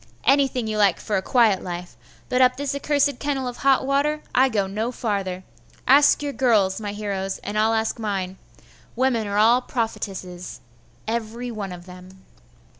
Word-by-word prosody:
anything 270 -3 +2
you 215 -1 -2
like 200 -4 +3
for 215 - -2
a 190 - +1
quiet 220 -3 +3
life; 175 0 -6 0.3
but 250 - +1
up 255 0 +4
this 280 0 -2
accursed 285 -1 +1
kennel 275 -3 -2
of 245 - -6
hot 270 -1 +3
water 290 +3 0
I 265 +1 +4
go 205 -5 0
no 215 +5 -3
farther. 195 -6 -3 0.4
Ask 285 +2 +5
your 285 -1 -3
girls, 220 -7 +2
my 205 -1 -4
heroes, 200 -2 -3
and 205 - -5
I'll 220 +1 +2
ask 220 +1 -1
mine. 190 -4 -3 0.6
Women 240 -3 +1
are 200 0 -2
all 230 +4 +5
prophetesses, 190 -7 -5 0.5
every 235 +2 -3
one 205 -4 -5
of 175 -1 -9
them. 185 +1 -14
220 Hz, 170 wpm, -23 LUFS, 195-260 Hz, 0.6 s, Ask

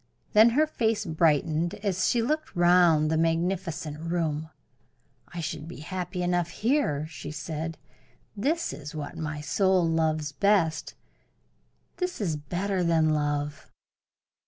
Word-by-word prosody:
Then 220 +2 +8
her 310 - +5
face 225 -8 0
brightened 160 0 +1
as 195 -3 0
she 235 -2 +2
looked 305 +6 -2
round 175 -3 +5
the 160 - +2
magnificent 165 -2 -1
room. 160 -2 -2 0.8
"I 175 - -6
should 155 0 -5
be 170 - -9
happy 180 +2 -4
enough 175 -1 +1
here," 215 - 0
she 155 -2 -8
said. 160 +1 -5 0.6
"This 305 +11 0
is 150 +2 -8
what 145 -2 -5
my 155 -2 -4
soul 185 +3 +2
loves 155 -2 0
best 175 -1 +1 1.0
this 360 -1 -3
is 175 -7 0
better 180 +6 -2
than 165 -2 +3
love." 145 -1 -1
165 Hz, 130 wpm, -27 LUFS, 155-190 Hz, 1.0 s, Then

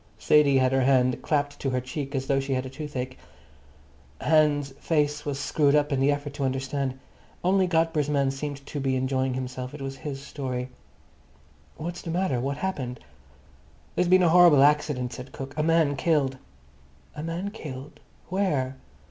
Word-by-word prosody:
Sadie 145 -2 +4
had 130 -1 +3
her 135 0 +2
hand 130 -1 +3
clapped 145 -1 -1
to 135 - -1
her 130 -1 0
cheek 135 +3 -5
as 135 0 -1
though 135 0 +2
she 135 0 -2
had 130 0 0
toothache. 130 -4 -5 1.0
Hans's 150 -3 +3
face 150 -2 0
was 140 -2 -2
screwed 145 0 +2
up 150 0 +2
in 135 - +1
the 135 +2 +4
effort 145 0 -3
to 140 - -4
understand. 135 0 -2 0.5
Only 185 +1 +3
Godber's 160 -4 +1
man 140 -2 +2
seemed 140 0 -6
to 145 - -5
be 135 -1 0
enjoying 130 0 0
himself; 130 +1 -5
it 150 - -9
was 135 0 -5
his 135 0 -5
story. 130 -3 -4 1.1
"What's 175 +3 -5
the 165 - -7
matter? 170 -6 0
What's 140 +3 -3
happened?" 130 -10 -3 0.9
"There's 180 - +1
been 185 +1 +5
a 170 - +5
horrible 170 -5 +7
accident," 145 -4 +2
said 130 +1 -9
Cook. 135 0 -7
"A 155 - 0
man 160 -2 +3
killed." 135 -3 +1 0.8
"A 150 - -5
man 170 +5 -3
killed! 145 -8 -8 0.3
Where? 150 -9 0
140 Hz, 170 wpm, -26 LUFS, 130-155 Hz, 1.1 s, horrible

